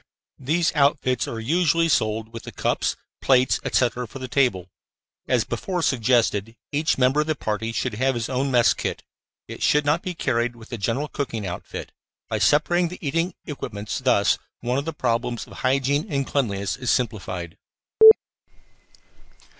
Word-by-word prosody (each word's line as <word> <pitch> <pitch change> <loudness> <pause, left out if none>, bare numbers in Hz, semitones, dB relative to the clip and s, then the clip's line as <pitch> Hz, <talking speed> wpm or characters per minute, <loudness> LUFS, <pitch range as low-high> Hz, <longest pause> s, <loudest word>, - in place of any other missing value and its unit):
These 160 +5 +1
outfits 140 -4 +2
are 115 - -5
usually 165 +6 +2
sold 110 -5 0
with 115 - -6
the - - -9
cups, - - -1 0.3
plates, 130 -1 +3
etc., 125 0 0
for 120 - -10
the 130 -1 -6
table. 120 -9 +1 0.6
As - - +2
before 180 -3 -3
suggested, 115 -4 +1 0.2
each 150 +2 +1
member 130 +3 +3
of 150 - -3
the 155 - 0
party 110 -2 -3
should 120 +1 -2
have 130 +4 0
his 115 -1 -2
own 135 +1 -1
mess 120 -3 +4
kit. - - -4 0.4
It - - -9
should 150 0 +3
not 150 +4 +2
be 180 -1 -5
carried 120 -4 0
with 115 -1 -14
the 120 - -5
general 120 +8 -1
cooking 115 -8 -4
outfit. 90 -1 -6 0.4
By - - -1
separating 175 +4 +3
the 180 - -8
eating 165 +4 -1
equipments 105 -8 -5
thus, 125 -6 +2 0.2
one 125 +3 0
of 140 - -5
the 165 - -2
problems 120 -3 -1
of - - -14
hygiene 135 +3 +1
and 140 -1 0
cleanliness 100 -9 -1
is 130 -3 -3
simplified. 95 -8 -2
130 Hz, 160 wpm, -23 LUFS, 115-145 Hz, 0.6 s, mess